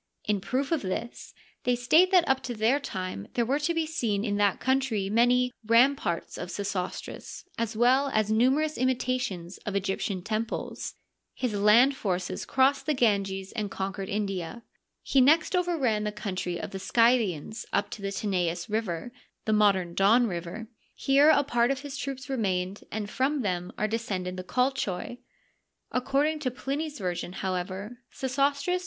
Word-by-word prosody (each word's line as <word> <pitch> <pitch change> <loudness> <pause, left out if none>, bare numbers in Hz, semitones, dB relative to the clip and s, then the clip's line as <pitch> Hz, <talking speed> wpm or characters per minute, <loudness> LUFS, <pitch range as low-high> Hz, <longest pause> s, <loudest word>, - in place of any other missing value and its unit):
In 205 -2 0
proof 265 - -2
of 325 - +1
this, 195 +5 -5 0.3
they 250 0 +2
state 310 +10 +4
that 360 -3 +4
up 265 0 +2
to 240 - -3
their 225 +6 +2
time 185 - -5
there 235 - +2
were 275 +5 +1
to 300 +3 0
be 330 -1 0
seen 235 -10 -1
in 205 -2 0
that 205 -2 +2
country 260 -7 0
many 245 +2 +3
" - - -29
ramparts 240 -9 +2
of - - -5
Sesostris," 200 -2 -5
as 225 -1 -2
well 260 +4 +4
as 215 -2 +1
numerous 270 +8 +2
imitations 250 -8 -1
of 205 - -5
Egyptian 195 -1 -2
temples. 220 +2 -3 0.4
His 250 -4 -2
land 215 +7 +5
forces 185 -6 -2
crossed 265 +2 +2
the 305 - +2
Ganges 195 -5 +1
and 215 -3 -3
conquered 195 0 -4
India. 195 0 -3 0.4
He 270 - +3
next 310 +7 +4
over 355 -1 +1
ran 225 -7 +1
the 210 - -1
country 185 -4 -4
of - - -6
the 195 - -5
Scythians 225 -4 +1
up - - 0
to 210 - -7
the 195 0 -3
Tanais 180 -4 -1
River 215 -1 -2 0.3
(the 220 - +1
modem 195 -5 +3
Don 215 +7 +4
River 175 +1 -4
f). 225 - -9 0.3
Here 280 +3 +4
a 295 -2 +5
part 240 -3 +2
of 275 0 -1
his 285 -2 -7
troops 270 0 -5
remained, 195 -7 -2
and 215 -1 -3
from 265 +5 0
them 180 -3 -2
are 215 - +1
descended 195 -5 -3
the 185 - -5
Colchoi. 245 -2 -1 0.7
According 285 +5 +1
to 280 -4 -1
Pliny's 285 +4 -4
version, 180 -2 -3
however, 190 +5 -4
Sesostris. 280 +6 0
225 Hz, 165 wpm, -28 LUFS, 195-265 Hz, 0.7 s, land